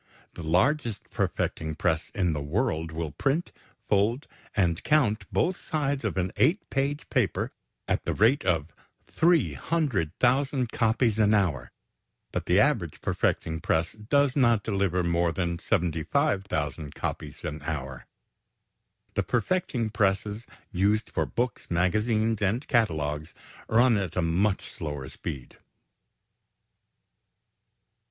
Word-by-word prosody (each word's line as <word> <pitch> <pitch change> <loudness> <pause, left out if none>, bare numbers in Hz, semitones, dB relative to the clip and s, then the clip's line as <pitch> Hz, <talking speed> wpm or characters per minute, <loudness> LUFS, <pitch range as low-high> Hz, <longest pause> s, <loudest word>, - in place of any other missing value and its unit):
The - - -8
largest 115 - +1
perfecting 80 -1 -2
press 80 0 0
in 90 -5 +1
the 75 - -3
world 80 - -1
will 80 -1 -4
print, 140 - -1 0.4
fold, 110 +6 +2 0.3
and 85 -5 +1
count 125 -8 +2
both 180 +2 0
sides 145 -3 0
of 105 -3 -2
an 90 0 0
eight 170 +10 +2
page 140 +2 -1
paper - - 0 0.4
at - - 0
the - - 0
rate 120 +7 +4
of 80 -4 0 0.3
300,000 135 - +1
copies 115 -1 +1
an 105 0 +5
hour, 75 - 0 0.6
but - - -3
the - - +4
average - - +1
perfecting 80 0 0
press 80 +1 0
does 130 +6 +1
not 120 -6 +3
deliver 95 -4 0
more 85 0 +1
than 85 -1 -2
75,000 80 - -1
copies - - -5
an 75 0 -4
hour. 70 -4 -5 1.1
The - - +1
perfecting 125 - 0
presses 105 +2 0 0.2
used 105 +3 +1
for - - 0
books, 120 -3 -3
magazines, 110 +5 +1
and 105 +7 0
catalogues 80 - 0 0.3
run 120 0 +4
at 95 -4 -3
a 90 - +1
much 95 +5 0
slower 75 -4 -5
speed. 65 -2 -7
100 Hz, 120 wpm, -27 LUFS, 80-125 Hz, 1.1 s, an